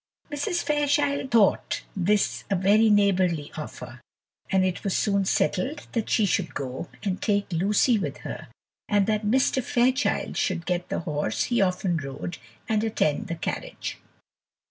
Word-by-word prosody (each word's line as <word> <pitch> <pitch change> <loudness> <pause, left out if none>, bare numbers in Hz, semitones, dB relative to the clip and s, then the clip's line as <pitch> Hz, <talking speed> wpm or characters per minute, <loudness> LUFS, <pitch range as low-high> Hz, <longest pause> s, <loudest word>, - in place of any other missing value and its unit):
Mrs. 290 +4 -1
Fairchild 290 -2 +1
thought 225 -5 +2
this 200 +2 +1
a 200 - +2
very 205 +4 +4
neighbourly 185 -7 +2
offer, - - -8 0.5
and 190 -1 +3
it 185 -1 -2
was 195 - 0
soon 200 -2 +1
settled 265 +10 0
that 230 -2 -2
she 220 - +3
should 190 -2 -1
go, 130 +3 -4 0.2
and 195 -3 -2
take 205 -2 +1
Lucy 205 +7 +3
with - - -3
her, - - -6 0.4
and 205 -2 +3
that 215 0 0
Mr. 260 +2 +2
Fairchild 255 +4 +1
should 175 -2 -1
get 180 -1 -2
the - - -2
horse 145 -10 -1
he 240 - +1
often 185 -2 +1
rode 140 +3 -6 0.3
and 215 -1 +1
attend 210 -9 0
the 170 - -3
carriage. 165 - -5
200 Hz, 150 wpm, -26 LUFS, 175-225 Hz, 0.5 s, very